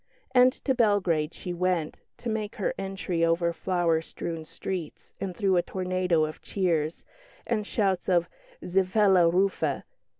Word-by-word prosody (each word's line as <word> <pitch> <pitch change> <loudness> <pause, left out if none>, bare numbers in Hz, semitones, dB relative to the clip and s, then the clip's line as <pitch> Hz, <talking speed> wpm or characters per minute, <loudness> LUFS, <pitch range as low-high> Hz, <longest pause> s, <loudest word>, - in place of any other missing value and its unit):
And 250 0 +7
to 265 - +3
Belgrade 195 -10 +2
she 180 - -6
went, 175 -3 -1 0.2
to - - -7
make 220 -2 -2
her 210 - -1
entry 190 -3 -2
over 170 +1 +2
flower 170 -2 +1
strewn 165 0 -6
streets, 170 0 -6
and 185 -3 -4
through 190 -2 +2
a - - +4
tornado 180 -3 0
of 155 - -7
cheers 165 -5 -1 0.4
and 210 -1 -1
shouts 195 -4 0
of 175 -2 +3 0.4
"Zivela 190 -1 +4
Rufe!" 190 +3 +1
185 Hz, 140 wpm, -27 LUFS, 170-195 Hz, 0.4 s, And